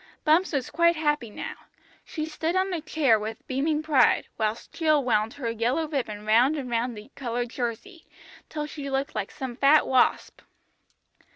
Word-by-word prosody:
Bumps 330 +4 +3
was 275 -5 -2
quite 340 0 +3
happy 295 -6 0
now. - - -6 0.5
She 310 -2 -4
stood 320 +2 -2
on 375 0 +1
a 335 - -2
chair 290 -7 +2
with 220 +1 -6
beaming 300 +4 -1
pride, 305 -4 +3
whilst 220 0 -3
Jill 310 -3 +2
wound 225 -2 +1
her 245 -5 -3
yellow 245 +8 0
ribbon 220 -8 -4
round 240 +7 +4
and 255 -4 -5
round 235 0 -1
the 210 +6 -12
coloured 245 -2 -3
jersey, 255 - -5 0.4
till 300 -1 -4
she 290 -2 -6
looked 270 +1 -2
like - - -3
some 260 -4 -6
fat 285 +4 +5
wasp. 260 -1 +1
275 Hz, 170 wpm, -26 LUFS, 235-310 Hz, 0.5 s, fat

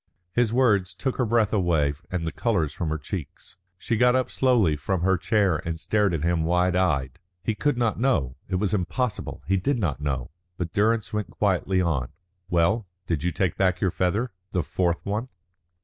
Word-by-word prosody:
His 120 -2 +2
words 110 -7 +2
took 130 -3 -2
her 125 - +2
breath 110 -2 +2
away 85 -8 +2 0.2
and 90 -3 -2
the 80 - -2
colour 100 -10 +1
from 80 +3 -3
her 80 - -1
cheeks. 80 - -7 0.2
She 115 +5 -1
got 125 +2 +4
up 130 -1 0
slowly 120 - +3
from 85 +4 -2
her 95 +1 +3
chair 95 -1 +2
and 85 -1 -3
stared 105 +2 +2
at 75 - -3
him 85 -1 +1
wide 90 +2 +2
eyed. 70 -9 0 0.2
He 110 - 0
could 145 +4 0
not 115 -3 0
know. 95 - +1
It 95 - -1
was 95 +1 0
impossible. 105 +5 -2
He 95 +1 +2
did 125 +9 0
not 80 - -1
know. 65 -4 -2 0.3
But 85 -2 -4
Durrance 110 +1 +1
went 105 -1 -2
quietly 95 -2 +1
on. 70 -8 0 0.4
"Well? 90 +5 +2 0.2
Did 85 -4 -1
you 90 - 0
take 90 +1 -1
back 90 -2 +2
your 95 - +1
feather? 105 +9 0 0.2
The 90 -3 +1
fourth 85 +1 -1
one?" 105 +6 -2
95 Hz, 195 wpm, -25 LUFS, 85-110 Hz, 0.4 s, got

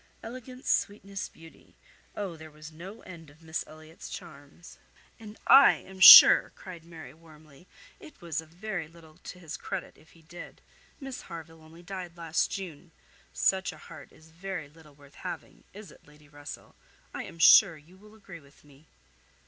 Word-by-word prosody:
'Elegance, 255 +2 -11
sweetness, 200 -1 -2
beauty.' 165 0 -19 0.4
Oh! 195 -5 -6
there 160 0 -13
was 155 +1 -14
no 185 +8 -12
end 165 -4 -13
of 155 +3 -22
Miss 160 0 -4
Elliot's 155 +1 -13
charms." 145 +4 -13 0.4
"And 215 -1 -12
I 275 - +7
am 190 0 -13
sure," - - +10
cried 175 -4 -12
Mary, 165 -4 -13
warmly, 155 0 -20 0.3
"it 305 - -16
was 165 -2 -5
a 160 - -18
very 175 0 -7
little 160 -1 -19
to 180 - -12
his 165 -4 -9
credit, - - -8
if 160 - -23
he 165 - -22
did. 175 +2 -13 0.4
Miss 270 -3 -8
Harville 165 -1 -12
only 160 +2 -17
died 180 -2 -9
last 165 -1 -1
June. 180 -4 -8 0.4
Such 190 0 0
a - - -14
heart - - -14
is 160 0 -21
very 175 -2 -7
little 150 -1 -20
worth 140 -1 -20
having; - - -10
is 205 -1 -13
it, - - -21
Lady 150 0 -21
Russell? 145 0 -12 0.4
I - - -6
am - - -13
sure 165 +1 +6
you 155 +5 -20
will 210 +3 -19
agree 195 -5 -13
with 140 -1 -23
me." 145 +1 -22
165 Hz, 175 wpm, -27 LUFS, 155-190 Hz, 0.4 s, sure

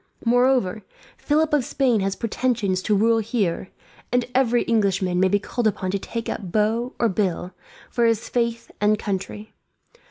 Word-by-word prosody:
Moreover, 245 -4 +2 0.3
Philip 305 +1 +1
of 290 -3 +3
Spain 245 -3 +1
has 195 0 -1
pretensions 230 -5 -1
to 210 - +1
rule 225 +3 +3
here; 205 -5 -1 0.4
and 245 0 +2
every 245 -2 +3
Englishman 195 -5 +1
may 190 - +4
be 205 - +3
called 225 +3 -1
upon 185 -3 -1
to 200 - -1
take 230 +3 -5
up 190 -5 -4
bow, 225 +4 0
or 235 - +2
bill, 185 -3 -1 0.4
for 235 - +2
his 230 0 0
faith 235 -1 -2
and 210 +1 +3
country. 205 +1 -5
220 Hz, 160 wpm, -23 LUFS, 195-240 Hz, 0.4 s, may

